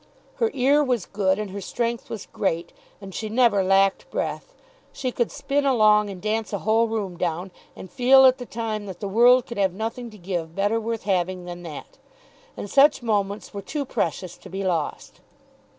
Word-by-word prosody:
Her 460 -2 +2
ear 275 +3 +4
was 245 -8 0
good, 195 -2 0
and 210 -2 -4
her 200 +1 -6
strength 235 +3 -3
was 220 -3 -6
great, 170 -3 -2 0.3
and 195 -2 -10
she 215 +3 -4
never 225 -4 +3
lacked 195 +1 +2
breath. - - -4 0.4
She 255 -2 -3
could 240 -1 -1
spin 285 +1 -1
along 215 -6 +4
and 190 -2 -7
dance 215 +2 -2
a 200 - -1
whole 225 +1 +3
room 205 -5 -3
down, 175 +2 -2 0.2
and - - -9
feel 260 +7 +6
at 260 0 +5
the 245 - -7
time 215 -2 -4
that 185 -2 -8
the 200 - -4
world 240 +5 +5
could 235 -3 -7
have 190 -2 +2
nothing 230 +3 -4
to 215 - -14
give 170 -3 -4
better 205 +3 +1
worth 225 0 -3
having 185 -2 -1
than 175 0 -7
that; 160 -4 -10 0.6
and - - -5
such 275 +3 +4
moments 205 -2 -1
were 200 - -5
too 285 +8 -4
precious 185 - -3
to 190 - -13
be 195 +2 -4
lost. 170 -5 -3
210 Hz, 195 wpm, -24 LUFS, 190-235 Hz, 0.6 s, feel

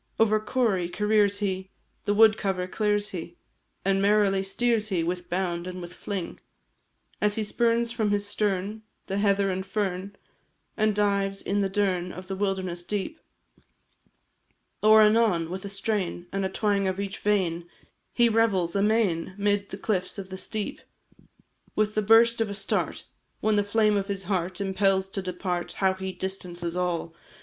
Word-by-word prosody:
Over 215 -1 +4
corrie 215 -6 0
careers 210 0 +2
he, 190 -1 -2 0.4
The 205 - +1
wood 220 0 +7
cover 190 -4 -1
clears 205 +2 0
he, 175 -1 -7 0.5
And 195 0 +2
merrily 200 -1 +3
steers 220 +3 0
he 180 -4 0
With 180 +1 -3
bound, 175 -1 -2
and 185 0 -6
with 175 0 -8
fling, 190 -3 -5 0.8
As 210 0 +2
he 220 - -1
spurns 235 +2 +1
from 225 -3 0
his 205 0 0
stern 205 +1 -1 0.2
The 195 +1 -2
heather 200 -1 +2
and 190 +1 -2
fern, 195 -1 -3 0.6
And 215 -1 +2
dives 200 -1 0
in 205 +1 0
the 195 - 0
dern 185 -3 0
Of 185 +1 -9
the 195 - -2
wilderness 190 -3 -2
deep; 205 - -4 1.6
Or, 215 +1 +7
anon, 210 -7 +3
with 190 +2 -5
a - - -4
strain, 195 -3 -2
And 195 0 -1
a 190 - 0
twang 200 0 +1
of 190 +1 -2
each 200 -1 -4
vein 175 -5 0 0.4
He 240 -1 +4
revels 210 -6 +2
amain 200 -4 +1
'Mid 205 0 0
the 195 - -6
cliffs 195 -3 -1
of 195 -1 -6
the 190 - -6
steep. 210 +2 -4 0.9
With 215 0 +1
the 215 - +1
burst 230 +2 +5
of 225 - 0
a 200 - -4
start 195 - -1 0.4
When 215 0 +2
the 205 - +3
flame 210 0 +2
of 195 -1 -1
his 200 -2 -3
heart 185 -1 -2
Impels 195 -1 +1
to 195 - -4
depart, 180 -1 -3
How 190 -1 +2
he 190 0 -5
distances 180 -2 -5
all! 175 -2 -1
195 Hz, 165 wpm, -26 LUFS, 185-210 Hz, 1.6 s, wood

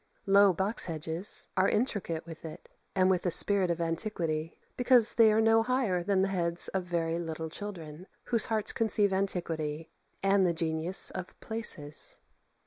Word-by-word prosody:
Low 200 0 +5
box 190 +5 0
hedges 165 +3 -3
are 190 +1 +2
intricate 205 -9 -2
with 165 -2 -11
it, 160 -1 -10 0.3
and 185 -1 +3
with 185 -2 +2
the 180 - -1
spirit 195 +1 +3
of 170 0 -2
antiquity, 165 -2 -3 0.2
because 245 -2 +3
they 225 -2 +5
are 215 - +2
no 225 0 +4
higher 230 -7 0
than 190 +1 +1
the 195 - 0
heads 170 -1 0
of 190 -2 -3
very 170 -1 -2
little 160 -1 -5
children, 175 -4 -8 0.2
whose 230 -3 +3
hearts 220 -2 -1
conceive 210 -3 +1
antiquity 165 -5 -3 0.3
and 195 0 +3
the 175 -2 +1
genius 160 +2 +2
of 185 -1 -8
places. 220 -10 0
185 Hz, 160 wpm, -29 LUFS, 165-205 Hz, 0.3 s, Low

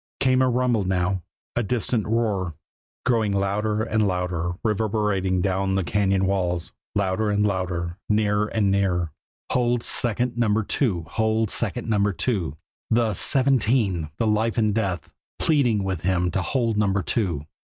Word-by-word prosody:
Came 130 -1 +3
a 130 - +3
rumble 125 -3 +1
now 90 0 0 0.3
a 120 - +2
distant 120 0 -1
roar, 105 -7 0 0.5
growing 115 -5 +2
louder 105 +2 0
and 110 -2 +1
louder, 90 -2 -1
reverberating 105 -4 0
down 95 0 0
the 95 - +1
cañon 95 0 +1
walls 90 -3 -1 0.2
louder 100 +1 +1
and 105 0 +2
louder 90 -3 -2
nearer 105 0 +2
and 105 -3 +1
nearer. 90 -4 +1 0.4
"Hold 120 -1 +1
second 120 +1 0
Number 110 -2 +2
Two. 100 - 0
Hold 110 -1 0
second 115 +1 -1
Number 105 -2 +2
Two" 85 - -1 0.3
the 115 -1 +2
"seventeen," 115 - +2
the 115 - 0
life 110 +2 +1
and 110 -2 +2
death, 95 -7 -2 0.3
pleading 125 -10 +2
with 95 -4 -2
him 90 0 +1
to 95 - 0
hold 115 +1 0
Number 100 -2 +1
Two. 85 -11 -1
105 Hz, 145 wpm, -24 LUFS, 95-115 Hz, 0.5 s, Came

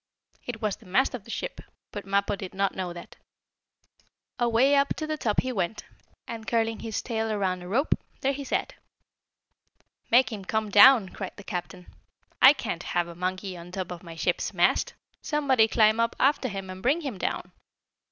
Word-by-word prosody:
It 225 -3 -6
was 210 -2 0
the 220 - -18
mast 260 +11 +2
of 235 -5 -7
the - - -15
ship, - - -5 0.3
but 205 -2 -7
Mappo 200 +1 +1
did 190 -1 -8
not 195 0 +1
know 185 -2 -4
that. 175 0 -11 1.2
Away 240 +4 +4
up 280 0 +2
to 310 - -4
the 310 0 -2
top 225 -8 0
he 255 - -3
went, 195 -3 -2 0.4
and, 225 -2 -7
curling 225 +1 0
his 225 -2 -4
tail 225 -2 -2
around 190 -3 -1
a 180 - -9
rope, 255 - +2 0.3
there 275 +1 +1
he 280 +1 -5
sat. 270 - -2 1.4
"Make 250 +2 +5
him 205 -3 -6
come 215 +1 -2
down!" 210 -1 +8
cried 190 0 -7
the 205 - -11
captain. 180 -2 -6 0.6
"I 265 - +10
can't 175 - -4
have 175 -1 -1
a 170 - -8
monkey 185 +2 -3
on 175 0 -10
top 185 -1 -4
of 175 -1 -7
my 170 -2 -10
ship's 160 - -1
mast! - - +2 0.3
Somebody 270 -7 +2
climb 220 0 +3
up 230 0 +1
after 275 -1 +3
him 195 -4 -6
and 185 0 -9
bring 285 - +2
him 260 - -5
down." - - -3
215 Hz, 190 wpm, -27 LUFS, 185-250 Hz, 1.4 s, I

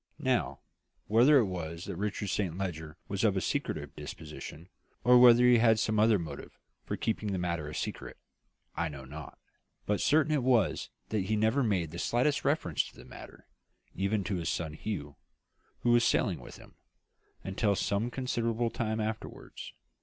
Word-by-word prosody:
"Now, - - 0 0.4
whether 120 +8 +6
it 120 - +4
was 85 -3 -5
that - - -5
Richard 105 +1 -3
Saint 90 -4 -1
Leger 80 -4 -5
was 100 +1 -2
of 100 -3 +3
a - - +3
secretive - - -3
disposition, 75 +2 -9 0.4
or 125 +1 +7
whether 120 -1 +8
he 125 -1 +6
had 115 -1 +5
some 110 -1 +1
other 110 0 +5
motive 80 -6 -8 0.3
for - - -4
keeping 110 -2 -2
the 95 - -1
matter 85 -4 -2
a 75 - -7
secret, - - -5 0.6
I 85 0 -1
know 70 -3 -9
not; 75 +2 -9 0.5
but 105 -1 0
certain 155 +1 +3
it 125 -8 +3
is - - -7 0.2
that 105 -4 -1
he 110 - 0
never 110 +6 +2
made 95 - 0
the 85 - -6
slightest 130 +8 +1
reference 135 - +1
to - - -16
the - - -13
matter - - -12 0.5
even 100 +2 0
to 95 0 -2
his 85 -1 -2
son 80 -3 -2
Hugh, 75 -6 -5 0.6
who 120 - +2
was 120 0 +5
sailing - - +2
with - - -11
him - - -17 0.7
until 100 +2 0
some 100 +5 0
considerable 120 -2 -1
time 110 -1 -2
afterwards. 110 0 -5
105 Hz, 175 wpm, -30 LUFS, 85-115 Hz, 0.7 s, whether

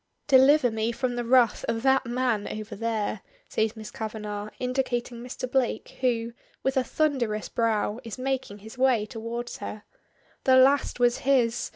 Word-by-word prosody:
"Deliver 270 -1 +6
me 220 +1 -1
from 245 +1 -2
the 240 - -2
wrath 240 -1 +3
of 225 0 -1
that 265 -2 +3
man 240 -3 0
over 215 0 -6
there," 220 -2 -2 0.3
says 220 0 0
Miss 215 -1 -9
Kavanagh, 210 -1 -5
indicating 250 -2 -2
Mr. 250 +1 -5
Blake, 250 -1 -1
who, 235 -2 0 0.3
with 265 +1 0
a 260 - +3
thunderous 250 -9 -1
brow, 225 -1 0
is 230 0 -7
making 260 -5 -3
his 225 +3 -11
way 255 -5 +3
towards 235 +1 -5
her. 210 0 -7 0.6
"The 260 -1 +6
last 270 0 +4
was 245 0 +3
his. 245 -4 +1
240 Hz, 160 wpm, -26 LUFS, 220-260 Hz, 0.6 s, Deliver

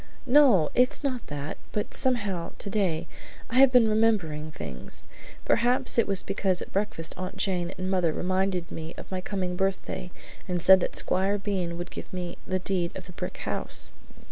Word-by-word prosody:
"No, 250 - +5
it's 250 +3 +2
not 255 -4 -2
that; 145 0 -5
but 210 - -3
somehow, 205 -9 0
today, 190 -5 -1 0.5
I 250 - +3
have 270 -1 +7
been 245 -3 +6
remembering 200 -9 +1
things. 65 - -6 0.4
Perhaps 250 +1 +4
it 230 - +3
was 195 -2 +1
because 195 -2 0
at - - -7
breakfast 195 -5 -1
Aunt 185 0 -5
Jane 180 -3 0
and 185 0 -3
mother 180 -4 +2
reminded 185 +1 -1
me 160 +1 -7
of - - -10
my 185 -1 -2
coming 185 -2 -3
birthday 190 -1 -2 0.4
and 180 -1 -1
said 190 +2 +7
that - - -2
Squire 195 +2 +1
Bean 190 -4 -2
would 175 +1 -6
give - - -8
me 180 -1 -5
the 185 - 0
deed 180 -2 -2
of 185 - -9
the 180 - -11
brick - - -6
house. - - +3
185 Hz, 175 wpm, -27 LUFS, 175-210 Hz, 0.5 s, have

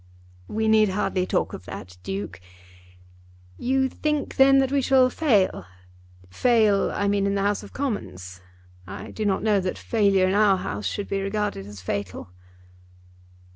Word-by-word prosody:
"We 220 +1 -1
need 215 -1 +4
hardly 185 -1 -1
talk - - -1
of 95 - -8
that, 90 0 -9
Duke. 95 0 -5 1.2
You 265 +1 +1
think 300 +2 -3
then 270 0 +6
that 270 -1 +2
we 280 -1 +2
shall 260 -1 +4
fail; 210 - +1 0.6
fail, 215 - +3
I 200 - -1
mean, 200 0 +1
in 200 - 0
the 195 - 0
House 205 0 0
of - - -12
Commons. 95 - -5 0.5
I 95 - -8
do 215 - -4
not 195 0 0
know 210 -2 +3
that 185 -1 -3
failure 200 -4 +2
in 185 - 0
our 205 -2 +4
House 100 - -4
should 205 - -4
be 195 0 -2
regarded 195 - -3
as 105 -2 -10
fatal." 95 -1 -5
200 Hz, 160 wpm, -24 LUFS, -, 1.2 s, then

